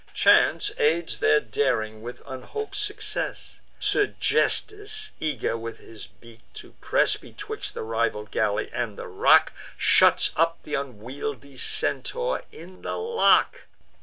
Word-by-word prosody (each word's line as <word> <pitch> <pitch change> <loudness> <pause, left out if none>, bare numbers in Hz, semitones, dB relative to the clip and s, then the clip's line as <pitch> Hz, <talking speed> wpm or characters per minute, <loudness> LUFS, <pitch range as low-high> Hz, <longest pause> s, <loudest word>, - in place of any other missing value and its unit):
Chance 415 - +4
aids 450 -7 +1
their 435 -1 +4
daring 110 - -1
with 120 +2 -9
unhop'd 140 - -7
success; 420 0 -3 0.2
Sergesthus, 420 +1 +1
eager 145 -7 -2
with 115 0 -6
his 110 -2 -12
beak 115 -1 -18 0.2
to - - -11
press - - +3
Betwixt - - -6
the - - -4
rival 110 -1 -1
galley 105 -1 -1
and 115 -4 -3
the - - -7
rock, 90 - +4 0.2
Shuts - - +4
up 165 +1 +2
th' 150 - -9
unwieldly 135 +2 -5
Centaur 485 - -1
in 180 +3 -13
the - - -4
lock. 465 +2 +2
145 Hz, 125 wpm, -25 LUFS, -, 0.2 s, Chance